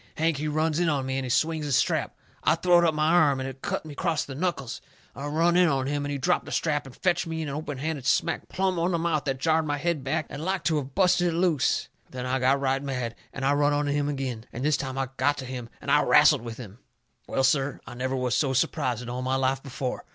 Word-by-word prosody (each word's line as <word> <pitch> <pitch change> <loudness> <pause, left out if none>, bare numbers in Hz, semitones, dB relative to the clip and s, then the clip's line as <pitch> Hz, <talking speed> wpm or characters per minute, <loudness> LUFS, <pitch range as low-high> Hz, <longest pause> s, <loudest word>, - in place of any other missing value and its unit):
Hank, 160 -1 +1
he 150 +2 -2
runs 155 +1 0
in 175 -2 +2
on 140 -3 0
me, 130 0 -2
and - - -3
he 130 - -4
swings 155 +4 +1
his 140 -3 +1
strap. - - +1 0.3
I - - +4
throwed 175 +1 +4
up 160 -2 +2
my 155 0 +1
arm, 150 -6 +4
and 130 - -3
it 135 0 -8
cut - - -3
me 155 - -8
acrost 160 0 -1
the 135 - -7
knuckles. 135 -6 -3 0.3
I 140 +3 -5
run 165 +4 +2
in 180 0 +5
on 135 -4 +1
him, 145 +1 -1
and 145 - -3
he 140 - -2
dropped 130 - +1
the - - -8
strap 145 -4 0
and 130 - -12
fetched 175 -2 0
me 160 0 -3
an 150 - -4
openhanded 145 -1 -4
smack - - +1
plumb 185 -1 0
on 175 +2 +1
the - - +2
mouth 165 -3 0
that 135 -2 -1
jarred 160 +3 +1
my 145 0 0
head 160 -1 -1
back 155 +3 -1
and 145 +2 -7
like 190 +2 -1
to 160 -3 +2
of 135 -1 -8
busted 180 -2 +3
it 165 - -1
loose. 170 -6 +1 0.2
Then 125 0 -6
I 130 +1 0
got 130 +2 +3
right 135 0 0
mad, 125 -4 -3 0.2
and 135 - -4
I 140 - +3
run 145 0 +2
in - - +2
on 145 - 0
him 145 0 0
agin, 130 -5 -4
and 125 +4 -4
this 150 -1 +3
time 130 -1 -4
I 135 -2 -1
got 145 +3 +2
to 135 - -5
him, 125 -2 -6
and 140 - -3 0.2
wrastled 150 -2 +6
with 115 -1 -7
him. 110 -2 -10 0.5
Well, 135 - 0
sir, 135 +1 +2
I 115 - -9
never 130 +2 -2
was 125 -1 -1
so 135 0 +1
surprised 130 -2 0
in - - -9
all 125 +1 -3
my 130 +1 0
life 135 0 +1
before. 135 -1 -5
145 Hz, 270 wpm, -26 LUFS, 130-160 Hz, 0.5 s, wrastled